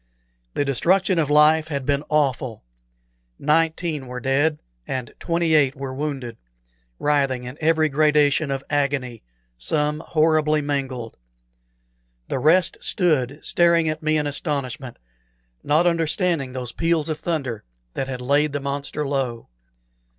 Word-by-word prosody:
The 145 - +1
destruction 180 - +2
of 150 -3 0
life 155 +1 +5
had 140 -4 -3
been 140 +1 0
awful. 135 - 0 0.7
Nineteen 160 -1 0
were 125 0 -6
dead, 140 +5 +1 0.3
and 130 -2 -4
twenty 170 -1 0
eight 140 -4 +4
were 135 -1 -5
wounded, 135 -5 -4 0.6
writhing 135 -4 +1
in 125 +2 -7
every 160 0 +3
gradation 150 0 +3
of 135 0 -2
agony, 140 -5 -1 0.4
some 150 - 0
horribly 155 -1 +2
mangled. 135 -5 -3 1.1
The - - -1
rest 165 +6 +3
stood 150 -6 +1
staring 170 -1 +3
at 155 0 -3
me 155 0 +1
in 150 - 0
astonishment, 140 -4 -3 0.7
not 155 +4 +3
understanding 165 -3 +1
those 125 -2 -4
peals 165 +2 0
of 155 -1 -3
thunder 135 -10 -3 0.3
that 135 - -3
had 130 -2 -5
laid 140 +3 +2
the 145 - -1
monster 140 +1 -3
low. 130 - -3
145 Hz, 130 wpm, -22 LUFS, 135-155 Hz, 1.1 s, life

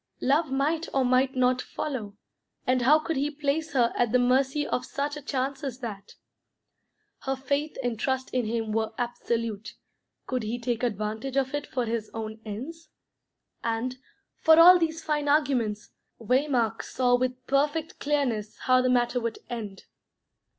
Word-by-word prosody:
Love 285 +2 +2
might 310 +5 0
or 265 -1 +3
might 255 +2 +2
not 255 0 +2
follow, 220 -9 -5 0.5
and 255 0 +2
how 280 +6 +6
could 315 -1 -3
he 285 +2 +1
place 300 +2 -2
her 240 -3 +3
at 240 -2 +1
the 250 - +5
mercy 265 +4 +2
of 250 - -1
such 290 +1 -3
a 295 - -7
chance 270 +1 -2
as 265 -4 -4
that? 210 -6 -7 1.0
Her 270 0 -2
faith 280 +3 -2
and 240 -3 -2
trust 260 0 -1
in 250 -2 +1
him 225 -1 -2
were 220 0 -1
absolute; 230 -3 -3 0.5
could 255 -1 -2
he 220 +2 -3
take 235 -1 -2
advantage 220 +3 -2
of 265 0 +1
it 290 0 -3
for 250 -2 -2
his 225 -1 -3
own 220 0 -5
ends? 265 +11 -7 0.7
And, 235 +3 -2 0.4
for 320 0 +6
all 355 +2 +9
these 325 -1 -1
fine 295 -1 0
arguments, 250 -8 +1 0.3
Waymark 245 -1 +1
saw 250 -1 0
with 255 0 -2
perfect 290 +4 0
clearness 250 -8 -1
how 255 0 +4
the 255 - +1
matter 245 0 +2
would 230 -1 -3
end. 210 -5 -6
255 Hz, 160 wpm, -27 LUFS, 230-285 Hz, 1.0 s, all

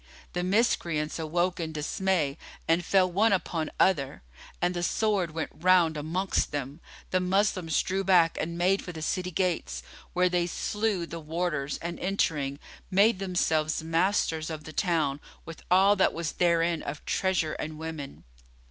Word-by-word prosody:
The 175 - -1
Miscreants 175 -6 +1
awoke 175 +3 0
in 160 -1 -3
dismay 155 -1 -1 0.3
and 165 +2 +3
fell 185 +1 +3
one 210 +5 +3
upon 165 -4 -1
other, 140 - +2 0.4
and 180 0 +1
the 175 - -3
sword 200 -1 +1
went 160 0 -4
round 175 -2 +3
amongst 165 +6 -1
them; 145 +1 -4 0.3
the 185 - +3
Moslems 185 -3 +1
drew 190 +1 -1
back 175 -3 +4
and 170 +2 -4
made 185 +3 +2
for 180 - -7
the 160 -2 -7
city 180 +2 -1
gates, 180 0 -1 0.3
where 180 0 +3
they 175 -1 +1
slew 205 0 -1
the 165 0 -7
warders 155 -3 -2
and 170 0 -4
entering, 155 -7 0 0.3
made 200 +2 +4
themselves 160 -5 0
masters 165 -1 +1
of 155 -1 -6
the 155 - -9
town 155 -6 0 0.3
with 165 -1 -9
all 195 +3 +5
that 190 - +3
was 165 -3 -3
therein 170 -1 +2
of 150 - -6
treasure 185 -5 0
and 155 0 -5
women. 160 -3 -7
170 Hz, 155 wpm, -28 LUFS, 155-185 Hz, 0.4 s, all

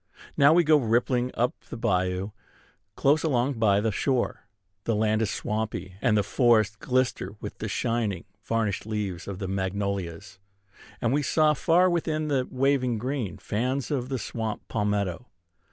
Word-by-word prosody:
Now 140 +1 +6
we 175 +2 +5
go 155 -1 +5
rippling 125 0 +1
up 120 +2 +1 0.2
the - - -6
bayou, 90 -1 0 0.6
close 145 +3 +3
along 130 -4 0
by 100 -3 +4
the 110 +1 0
shore. 125 +4 -1 0.4
The 115 - +1
land 110 +1 +2
is 110 - +1
swampy, 105 -4 -3
and 110 -4 +3
the 105 - +3
forests 110 -1 +3
glister 125 -5 -1
with 105 - -8
the 110 - -3
shining, 110 -3 -1 0.2
varnished 110 -3 -1
leaves 105 -5 -3
of 100 -2 -5
the 95 -1 -4
magnolias; 95 -2 -3 0.6
and 120 +1 +1
we 145 - +2
saw 155 +2 +3
far 175 +4 +3
within 155 -3 0
the 130 -3 +1
waving 130 -2 +1
green 125 -3 -3
fans 130 +7 -2
of 130 -3 -1
the 135 - -1
swamp 110 -2 -4
palmetto. 105 0 -1
115 Hz, 155 wpm, -26 LUFS, 100-130 Hz, 0.6 s, Now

